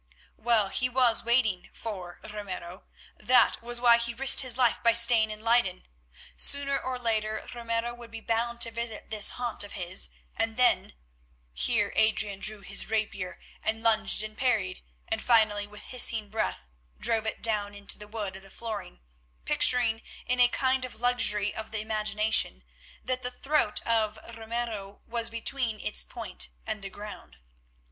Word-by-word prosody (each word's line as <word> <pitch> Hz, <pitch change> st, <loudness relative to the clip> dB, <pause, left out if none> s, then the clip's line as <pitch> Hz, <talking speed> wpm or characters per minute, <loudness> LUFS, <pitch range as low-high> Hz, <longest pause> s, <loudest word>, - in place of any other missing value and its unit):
Well, 220 Hz, -4 st, +2 dB
he 255 Hz, +5 st, +1 dB
was 250 Hz, -2 st, +3 dB
waiting 230 Hz, -6 st, +1 dB
for 185 Hz, -6 st, -7 dB
Ramiro. 195 Hz, -4 st, -8 dB, 0.3 s
That 255 Hz, 0 st, +4 dB
was 240 Hz, +1 st, -2 dB
why 235 Hz, -1 st, +5 dB
he 235 Hz, 0 st, -1 dB
risked 270 Hz, +2 st, +7 dB
his 255 Hz, -2 st, +1 dB
life 245 Hz, -3 st, +2 dB
by 230 Hz, -1 st, +4 dB
staying 230 Hz, -1 st, +7 dB
in 215 Hz, 0 st, -8 dB
Leyden. 230 Hz, -6 st, +1 dB, 0.5 s
Sooner 280 Hz, -1 st, +3 dB
or 260 Hz, -1 st, -4 dB
later 220 Hz, -3 st, -2 dB
Ramiro 235 Hz, 0 st, -3 dB
would 240 Hz, -1 st, -12 dB
be 225 Hz, 0 st, -8 dB
bound 235 Hz, +1 st, -2 dB
to 230 Hz, -, +4 dB
visit 230 Hz, -2 st, -6 dB
this 215 Hz, -2 st, +3 dB
haunt 240 Hz, -4 st, +2 dB
of 205 Hz, -, -10 dB
his, 185 Hz, 0 st, -1 dB, 0.3 s
and 225 Hz, 0 st, -1 dB
then—here 65 Hz, -, -1 dB
Adrian 215 Hz, -2 st, +1 dB
drew 215 Hz, 0 st, -1 dB
his 195 Hz, +2 st, +1 dB
rapier 210 Hz, -4 st, -3 dB, 0.2 s
and 220 Hz, +1 st, -2 dB
lunged 220 Hz, -2 st, +3 dB
and 215 Hz, 0 st, -8 dB
parried, 220 Hz, -, -1 dB, 0.3 s
and -, -, -2 dB
finally 215 Hz, -4 st, +3 dB
with 210 Hz, 0 st, -12 dB
hissing 230 Hz, -4 st, +1 dB
breath 215 Hz, -, -3 dB, 0.3 s
drove 225 Hz, -1 st, 0 dB
it -, -, -5 dB
down 205 Hz, -3 st, 0 dB
into 200 Hz, +1 st, -5 dB
the 210 Hz, -, -10 dB
wood 210 Hz, -3 st, -4 dB
of 190 Hz, -, -8 dB
the 195 Hz, -, -12 dB
flooring, 210 Hz, -, -7 dB, 0.4 s
picturing, 235 Hz, -3 st, +3 dB, 0.2 s
in 250 Hz, 0 st, -1 dB
a 245 Hz, -, +7 dB
kind 260 Hz, +1 st, 0 dB
of 255 Hz, -3 st, -6 dB
luxury 230 Hz, -4 st, +1 dB
of 220 Hz, -, -6 dB
the 220 Hz, -, -3 dB
imagination, 215 Hz, -, 0 dB, 0.4 s
that 255 Hz, 0 st, -2 dB
the 250 Hz, -, -3 dB
throat 260 Hz, -3 st, -1 dB
of 220 Hz, -2 st, 0 dB, 0.2 s
Ramiro 225 Hz, -3 st, -5 dB
was 230 Hz, -1 st, 0 dB
between 230 Hz, -1 st, -2 dB
its -, -, -1 dB
point 65 Hz, +1 st, -2 dB, 0.2 s
and 215 Hz, -, -4 dB
the 195 Hz, -, -5 dB
ground. 205 Hz, -, -11 dB
220 Hz, 160 wpm, -28 LUFS, 205-235 Hz, 0.5 s, risked